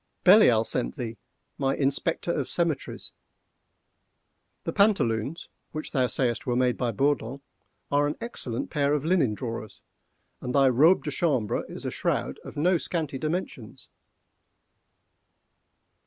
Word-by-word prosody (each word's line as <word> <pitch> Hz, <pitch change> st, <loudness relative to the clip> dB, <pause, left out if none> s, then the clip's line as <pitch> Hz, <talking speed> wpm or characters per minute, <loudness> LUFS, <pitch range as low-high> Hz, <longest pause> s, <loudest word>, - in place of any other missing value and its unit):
Belial 180 Hz, -, +7 dB
sent 65 Hz, -, 0 dB
thee,—my 125 Hz, +3 st, -5 dB
Inspector 145 Hz, +5 st, 0 dB
of -, -, -2 dB
Cemeteries. 170 Hz, -4 st, -2 dB, 1.5 s
The -, -, -3 dB
pantaloons, 160 Hz, -, +1 dB, 0.3 s
which 155 Hz, 0 st, -5 dB
thou 130 Hz, -3 st, +2 dB
sayest 120 Hz, +1 st, 0 dB
were 120 Hz, -, +1 dB
made 125 Hz, -1 st, +2 dB
by 125 Hz, -2 st, -1 dB
Bourdon, 135 Hz, +1 st, -1 dB, 0.5 s
are 145 Hz, +1 st, +3 dB
an 150 Hz, -, -3 dB
excellent 140 Hz, -, -4 dB
pair 145 Hz, 0 st, +1 dB
of 150 Hz, 0 st, -3 dB
linen 160 Hz, -, +2 dB
drawers, 115 Hz, -3 st, -6 dB, 0.6 s
and 125 Hz, -, -4 dB
thy 135 Hz, -1 st, +5 dB
robe 155 Hz, +9 st, +4 dB
de 150 Hz, -, -3 dB
chambre 135 Hz, -9 st, 0 dB
is -, -, -7 dB
a -, -, -2 dB
shroud -, -, -2 dB
of -, -, -10 dB
no 175 Hz, +3 st, +3 dB
scanty 155 Hz, -6 st, -3 dB
dimensions." 155 Hz, -, -5 dB
140 Hz, 125 wpm, -26 LUFS, 120-160 Hz, 1.5 s, Belial